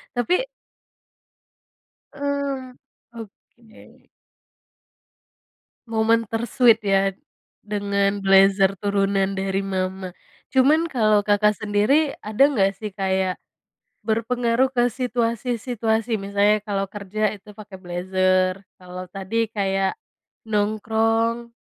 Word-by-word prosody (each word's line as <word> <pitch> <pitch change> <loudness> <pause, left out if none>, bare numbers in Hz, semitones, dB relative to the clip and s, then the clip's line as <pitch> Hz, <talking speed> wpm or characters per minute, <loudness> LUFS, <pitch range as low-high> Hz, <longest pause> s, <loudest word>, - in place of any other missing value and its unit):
Tapi 245 +9 0 1.8
Mmm, 280 -3 -3 0.4
Oke. 225 0 -15 1.8
Momen 225 0 +1
ter-sweet, 230 0 +3
ya, 195 0 +3 0.6
dengan 200 -1 -1
blazer 195 0 +4
turunan 195 0 0
dari 195 0 -2
mama. 185 -1 -3 0.4
Cuman 295 +5 +4
kalau 215 -9 +2
Kakak 210 0 +2
sendiri, 215 +9 +1
ada 215 +5 +1
enggak 195 -9 +1
sih 210 -2 -7
kayak 190 -1 -1 0.7
berpengaruh 235 +3 +1
ke 245 -2 +2
situasi-situasi? 235 -1 -1
Misalnya, 205 +1 +1
kalau 195 -2 -2
kerja 205 +2 -2
itu 210 +1 -15
pakai 210 -1 -12
blazer, 185 +1 0 0.2
kalau 180 0 -8
tadi 215 +4 -2
kayak 195 - -1 0.5
nongkrong 225 +2 0
210 Hz, 90 wpm, -22 LUFS, 195-230 Hz, 1.8 s, blazer